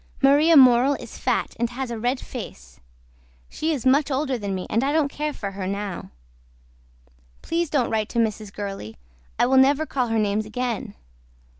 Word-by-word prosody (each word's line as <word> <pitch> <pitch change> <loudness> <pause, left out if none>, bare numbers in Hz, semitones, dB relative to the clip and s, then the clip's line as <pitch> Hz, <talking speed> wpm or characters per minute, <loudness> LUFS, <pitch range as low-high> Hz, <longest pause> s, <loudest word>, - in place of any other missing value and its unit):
MARIA 295 +4 +6
MORELL 255 +1 +6
IS - - -10
FAT - - -1
AND 235 0 0
HAS 250 0 -5
A 230 - -4
RED 245 +3 0
FACE 65 - -9 0.7
SHE 320 - -2
IS 275 -6 -3
MUCH 275 +3 +3
OLDER 270 0 -1
THAN 200 -2 -3
ME 185 - -4
AND 230 +4 0
I 275 - +1
DON'T 310 -3 +2
CARE 300 0 -3
FOR 200 -8 -6
HER 190 -1 -5
NOW. 200 -1 -4 1.3
PLEASE 335 -1 -1
DON'T 275 -6 0
WRITE 220 -1 -1
TO - - -6
MRS. 215 -2 -1
GURLEY 195 - -6 0.4
I - - +3
WILL 265 +2 +3
NEVER 285 +4 +4
CALL 255 -5 -1
HER 225 0 0
NAMES 210 0 0
AGAIN. 240 +1 -4
245 Hz, 180 wpm, -23 LUFS, 210-280 Hz, 1.3 s, MARIA